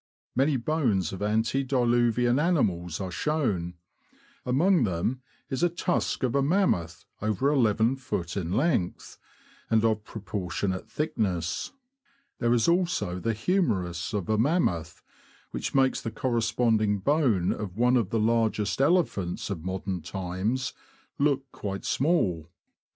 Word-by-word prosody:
Many 135 +2 +3
bones 115 - 0
of 95 - -7
antediluvian 120 +2 +2
animals 95 - +1
are 95 -2 -4
shown; 95 - -1 0.7
among 160 +5 +3
them 105 +6 -1 0.3
is 130 - -1
a 175 - +4
tusk 175 -3 -1
of 125 - +1
a 140 - +3
mammoth, 135 - +1 0.2
over 110 +8 +1
lift, 115 - +1
in 90 -4 -2
length, 115 - -1 0.5
and 110 0 +3
of 110 -1 +1
pro 110 -1 -9
portionate 95 -1 -3
thickness. 95 - -2 0.7
There 120 -1 +1
is 120 -2 +3
also 170 - +1
the 115 +5 -1
humerus 105 - 0
of 100 -5 -2
a 110 -1 +1
mammoth, 110 - 0 0.5
which - - -4
makes 135 -1 +3
the 115 - -3
corresponding 115 -3 +1
bone 115 - +2
of 100 -3 -6
one 125 +2 +4
of 115 -7 +1
the 115 - 0
largest 110 -1 +1
elephants 135 - +1
of 85 -5 -4
modern 95 0 -3
times 95 +8 -2 0.5
look 140 -2 +2
quite 100 -2 -5
small. 95 - +1
110 Hz, 130 wpm, -27 LUFS, 95-135 Hz, 0.7 s, a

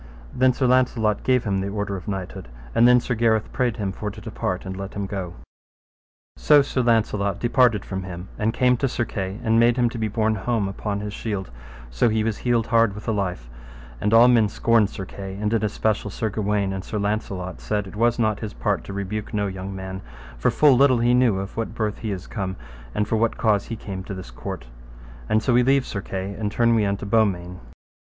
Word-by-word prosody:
And - - -7
then 130 0 +6
Sir 130 +1 -1
Launcelot 125 -4 +2
gave 125 -2 +2
him 100 -3 0
the 100 - -3
order 100 -1 -3
of 95 - -8
knighthood, 95 -9 -5 0.3
and 120 - +5
then 125 0 +7
Sir 125 - -2
Gareth 110 -2 +1
prayed 125 -3 0
him 100 -3 -2
for 105 +2 -4
to 105 +2 -10
depart 100 -4 -4
and 95 0 -5
let 95 +1 -7
him 100 -1 -2
go. 95 -3 -5 1.0
So 145 -2 +5
Sir 135 -1 -1
Launcelot 105 -4 +1
departed 120 -4 +3
from 95 -1 -4
him 90 -1 -7
and 110 +1 +1
came 125 +1 +3
to 135 - 0
Sir 120 -1 -1
Kay, 95 -1 -4
and 115 -1 +3
made 120 +1 +4
him 120 -1 +3
to 120 - -6
be 110 - 0
borne 110 +1 +1
home 110 0 -1
upon 100 +1 -3
his 105 0 -5
shield, 100 -4 -4
and - - -16
so - - +3
he 110 0 +1
was 110 -1 -2
healed 120 -2 +1
hard 115 -3 +3
with 105 - -9
the 110 - 0
life; 90 - -3 0.5
and 105 - +1
all 115 +2 +7
men 115 -4 +4
scorned 115 -1 +2
Sir 95 - -6
Kay, 95 0 -8
and 105 +1 -1
in 110 -2 +1
especial 105 0 0
Sir 110 +2 -3
Gawaine 100 -1 0
and 95 -1 -4
Sir 110 - -4
Launcelot 100 -3 -3
said 105 -1 -1
it 95 - -10
was 120 +2 +2
not 110 -3 +1
his 110 -2 -5
part 105 -3 -1
to 100 - -7
rebuke 100 +3 -4
no 105 -1 +1
young 95 0 -5
man, 95 0 -6 0.3
for - - +1
full 145 -3 +5
little 130 0 +5
knew 120 -1 +3
he 95 - -2
of 100 - -10
what 115 -1 -3
birth 105 -2 -2
he 110 - -3
is 95 -2 -5
come, 95 -4 -4 0.4
and 105 - 0
for 110 - +1
what 115 +1 +1
cause 105 -3 +2
he 115 - -5
came 95 -3 -6
to 100 - -6
this 95 -10 -9
court; - - -7 0.6
and 110 0 +2
so 125 - +2
we 120 - +5
leave 135 +1 +3
Sir 100 - -4
Kay 95 +1 -4
and 105 0 -3
turn 115 +1 +3
we 110 -2 +3
unto 100 +1 -2
Beaumains. 95 -4 +1
105 Hz, 230 wpm, -23 LUFS, 95-115 Hz, 1.0 s, then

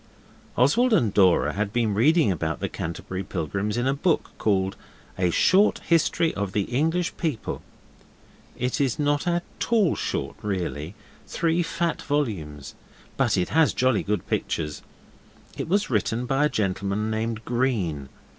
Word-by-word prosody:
Oswald 225 - +4
and 115 - +3
Dora 95 -4 +4
had 100 0 -2
been 115 -2 +1
reading 145 - +4
about 80 -2 -2
the - - -1
Canterbury 95 +3 -5
Pilgrims 100 +6 -3
in 120 - 0
a 135 - +2
book 155 +3 0
called 95 -2 +1 0.4
A 90 -1 +1
Short 190 - +4
History 165 0 +2
of 100 -2 -3
the 105 - +1
English 160 - 0
People. 155 -10 -3 1.0
It 125 +4 -1
is 135 -4 +1
not 145 +2 0
at 175 0 +1 0.3
all 215 -8 +3
short - - -3
really 90 -4 -3 0.3
three 165 +1 +1
fat 170 0 -1
volumes 95 - -3 0.4
but - - +2
it 90 - 0
has 160 -1 +3
jolly 130 -4 +2
good 105 +1 -2
pictures. 75 -2 -2 0.7
It - - -4
was 200 -4 +1
written 115 +2 0
by 135 +3 +2
a - - +2
gentleman 100 +1 -1
named 110 0 -3
Green. 105 - -1
115 Hz, 145 wpm, -25 LUFS, 95-155 Hz, 1.0 s, Oswald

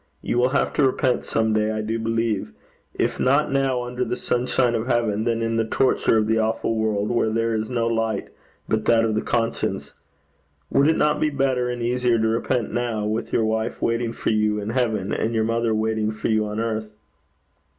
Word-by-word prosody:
You 120 - 0
will 125 +1 +3
have 140 - 0
to 145 - +2
repent 130 -1 +1
some 110 -1 0
day, 110 0 +1
I 110 0 -2
do 110 +2 -2
believe 115 -7 -1 0.4
if - - -1
not 140 +3 +2
now 135 -2 +1
under 125 +1 -3
the 125 0 -3
sunshine 125 0 +1
of 115 +1 -2
heaven, 115 -4 0
then 115 -1 0
in 115 0 0
the 115 - +2
torture 115 0 +2
of 110 - +2
the 110 +1 +1
awful 110 +1 0
world 110 -1 0
where 120 -2 +1
there 115 +1 0
is 110 +1 -2
no 120 -2 0
light 115 -2 -1 0.4
but 110 0 0
that 115 -1 +4
of 110 - 0
the 110 - 0
conscience. 115 -1 -2 0.8
Would 140 +1 +4
it 160 - +3
not 150 0 +2
be 155 - +2
better 135 -3 0
and 120 -1 -3
easier 125 0 +1
to 110 0 +1
repent 115 +1 -1
now, 120 -3 -1
with 110 +2 -2
your 115 - +2
wife 110 +1 -1
waiting 115 0 0
for 115 - -2
you 105 -1 +1
in 105 +1 -4
heaven, 110 -5 -1
and 115 +1 -1
your 110 - +2
mother 115 0 0
waiting 110 0 0
for 110 +1 -3
you 110 -1 +1
on 105 +1 -4
earth?' 110 -1 -2
115 Hz, 210 wpm, -23 LUFS, 110-120 Hz, 0.8 s, that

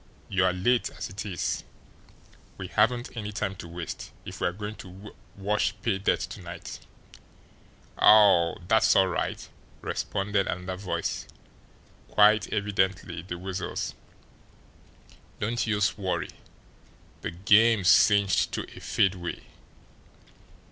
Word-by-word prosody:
You're 95 -1 +2
late, 115 +7 +1
as - - -7
it 95 +2 -6
is. 90 -3 -2 0.9
We 95 -2 -6
haven't 120 +8 +1
any 105 -2 -4
time 100 -1 -3
to 85 - -8
waste, 85 -1 -6 0.2
if - - -8
we're 90 - +1
going 105 +3 -6
to 95 +2 -11 0.2
wash 105 +2 0
pay 100 -5 0
dirt 100 - +1
to - - -6
night." - - -8 1.2
"Aw, 100 -6 +6
dat's 110 +2 +4
all 95 - +5
right!" 85 - -3 0.3
responded 100 -1 -1
another 90 +1 -3
voice 95 -1 -3 0.8
quite 105 0 +4
evidently 95 -4 -1
the 90 0 -6
Weasel's. 95 +1 -4 1.5
"Don't 115 +2 -1
youse 105 -2 +1
worry 95 -2 -2 0.9
de - - -3
game's 100 +3 +4
cinched 100 -4 +4
to - - -2
a - - -9
fadeaway." 90 -3 -1
100 Hz, 115 wpm, -27 LUFS, 90-105 Hz, 1.5 s, Aw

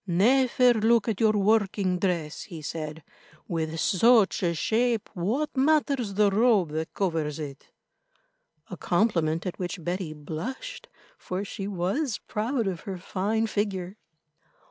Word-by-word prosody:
"Never 245 +6 +4
look 225 0 +3
at 220 -4 -1
your 220 -1 +4
working 200 -3 +2
dress," 170 -5 -1
he 160 -3 -9
said. 155 0 -5 0.4
"With 160 -2 -2
such 220 +4 +4
a 170 -2 +1
shape, 230 +5 0
what 245 - -1
matters 275 -6 +2
the 205 -1 +4
robe 210 -5 +3
that 160 +1 -4
covers 160 -6 -1
it?"—a - - -13
compliment 170 -4 +1
at 180 - -4
which 180 -1 -4
Betty 175 -1 -3
blushed, 230 - -6 0.3
for 185 +2 -4
she 195 -1 -5
was 200 - -1
proud 230 +3 -1
of 185 -3 -2
her 185 +4 -6
fine 205 +5 -1
figure. 200 -3 -2
195 Hz, 130 wpm, -27 LUFS, 170-235 Hz, 0.4 s, Never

